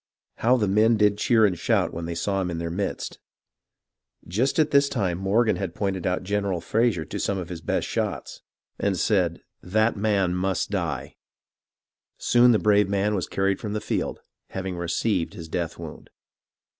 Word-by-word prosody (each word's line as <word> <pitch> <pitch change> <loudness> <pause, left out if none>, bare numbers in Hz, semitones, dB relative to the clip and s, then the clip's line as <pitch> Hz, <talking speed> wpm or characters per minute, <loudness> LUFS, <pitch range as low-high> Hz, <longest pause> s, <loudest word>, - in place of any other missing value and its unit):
How 125 +3 +3
the 105 -4 +1
men 110 +4 +4
did 105 -1 +3
cheer 115 -1 +4
and 95 -3 +2
shout - - +1
when 85 0 -4
they 85 0 -4
saw 95 +3 -1
him 90 - -2
in 85 - -3
their 85 0 -3
midst! 95 +3 -3 1.1
Just 115 +10 0
at 155 -2 +3
this 140 0 +4
time 95 -7 -1
Mor 100 +5 +2
gan 110 - +1
had 95 -4 -4
pointed 95 -3 -2
out 90 0 -1
General 100 -2 -1
Fraser 105 -2 +1
to - - -5
some 100 - -1
of 90 -2 -5
his 85 -2 -6
best - - -1
shots, - - -3 0.4
and 100 -2 0
said, 90 -3 +1
" - - -57
That 110 +2 +3
man 100 -4 +1
must 95 +1 -1
die." - - -3 1.0
Soon 120 0 +5
the 110 - +4
brave 105 -2 +3
man 100 +1 +1
was 95 -4 -1
carried 95 0 0
from 105 -1 -4
the 105 - -1
field, 105 - -3 0.3
having 95 -1 -4
received 85 +2 -1
his 85 -2 -8
death 85 0 -3
wound. 80 -2 -9
95 Hz, 185 wpm, -25 LUFS, 90-105 Hz, 1.1 s, Soon